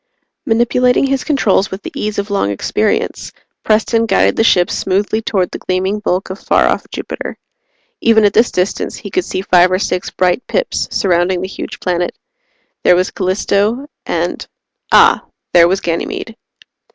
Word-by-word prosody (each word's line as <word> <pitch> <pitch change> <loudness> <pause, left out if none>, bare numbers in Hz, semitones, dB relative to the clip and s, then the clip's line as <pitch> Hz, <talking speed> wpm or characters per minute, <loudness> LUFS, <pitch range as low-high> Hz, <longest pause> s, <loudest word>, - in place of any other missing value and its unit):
Manipulating 245 +3 +2
his 270 -1 -1
controls 220 -10 +1
with 190 +2 -7
the - - -6
ease 210 0 -3
of 200 +1 -3
long 200 - 0
experience, 100 - -1 0.3
Preston 225 +1 +2
guided - - +2
the - - +2
ship 180 -5 +3
smoothly 205 +3 0
toward 190 -5 -1
the - - -6
gleaming 190 +3 -1
bulk 190 -2 -2
of 190 - -7
far - - +2
off - - -1
Jupiter. - - -6 0.6
Even 220 -2 +4
at 205 - +3
this 230 +2 +4
distance, 180 +2 -2
he - - -9
could 370 - 0
see 190 - -4
five 180 -1 +4
or 185 - +2
six 180 -1 -2
bright 180 +4 +1
pips - - -1
surrounding 180 -2 +1
the 190 - -3
huge 195 - -7
planet. 175 -1 -2 0.7
There 180 - +5
was 185 +2 0
Callisto, 200 +6 0 0.2
and - - -2 0.4
ah - - +5 0.3
there 170 -1 +7
was 190 +2 0
Ganymede. 170 +6 -3
195 Hz, 165 wpm, -15 LUFS, 185-225 Hz, 0.7 s, there